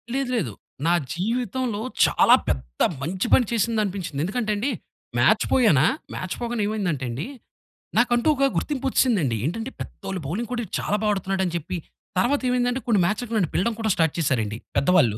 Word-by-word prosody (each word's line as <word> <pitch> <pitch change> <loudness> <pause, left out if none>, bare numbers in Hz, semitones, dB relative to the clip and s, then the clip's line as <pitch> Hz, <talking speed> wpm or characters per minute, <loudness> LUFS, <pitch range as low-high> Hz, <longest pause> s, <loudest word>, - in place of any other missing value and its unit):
లేదు, 270 -2 -1
లేదు. 135 - -2 0.3
నా 175 - +4 0.2
జీవితంలో 230 +3 -1 0.2
చాలా - - +6
పెద్ద 65 -2 -3 0.2
మంచి 185 - -2
పని 250 - +6
చేసిందనిపించింది. 200 -9 -1
ఎందుకంటే 215 +4 -1
అండి, 245 +8 -1 0.5
మ్యాచ్ - - +4
పోయానా! 160 - +5 0.3
మ్యాచ్ 185 - -4
పోగానే 235 -2 -1
ఏమైందంటే 180 -11 -1
అండీ, 125 - -4 0.7
నాకంటూ 240 +1 +3
ఒక 275 0 +3
గుర్తింపొచ్చేసిందండి. 245 - +1
ఏంటంటే, 225 - -3
పెద్దోళ్ళ 195 -1 -6
బౌలింగ్ 215 - -3
కూడా 240 -1 -1
ఈడు 185 - -19
చాలా 210 - 0
బా 215 - +2
ఆడతన్నాడని 190 -2 -1
చెప్పి. 170 +3 -4 0.4
తర్వాతేమైందంటే, 250 0 +1
కొన్ని 210 -5 +3
మ్యాచ్‌లకి 225 +4 -2
నన్ను 180 -7 +1
పిలడం 225 +5 +1
కూడా 220 - +1
స్టార్ట్ 160 -2 +1
చేసారండి 115 -7 0 0.2
పెద్దవాళ్ళు. 140 - +4
205 Hz, 150 wpm, -24 LUFS, 170-240 Hz, 0.7 s, చాలా